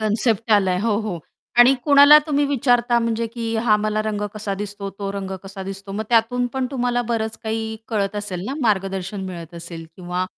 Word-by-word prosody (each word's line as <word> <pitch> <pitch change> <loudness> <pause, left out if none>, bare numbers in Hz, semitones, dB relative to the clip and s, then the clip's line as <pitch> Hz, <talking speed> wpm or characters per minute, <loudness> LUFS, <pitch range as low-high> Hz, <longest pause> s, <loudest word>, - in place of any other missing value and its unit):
Concept 220 +1 0
आलाय 190 -3 +3
हो, 215 -1 +1
हो 210 -6 -4 0.4
आणि 245 +3 +8
कुणाला 285 0 +8
तुम्ही 290 -1 +1
विचारता 245 -3 +2
म्हणजे, 230 0 -1
की 230 0 -4
हा 210 - +6
मला 215 0 -1
रंग 215 -1 -2
कसा 205 -2 -3
दिसतो, 200 -1 -6
तो 200 -1 -3
रंग 195 -1 -5
कसा 195 0 -8
दिसतो? 195 +1 -7
मग 215 +2 -3
त्यातून 245 +1 +2
पण 260 -1 0
तुम्हाला 245 -2 0
बरंच 220 -1 -2
काही 220 0 -3
कळत 205 -2 -1
असेल 190 -3 -4
ना, 270 - -3
मार्गदर्शन 195 -2 -1
मिळत 170 -2 -8
असेल 170 -1 -8
किंवा 180 0 -3
215 Hz, 185 wpm, -21 LUFS, 195-235 Hz, 0.4 s, आणि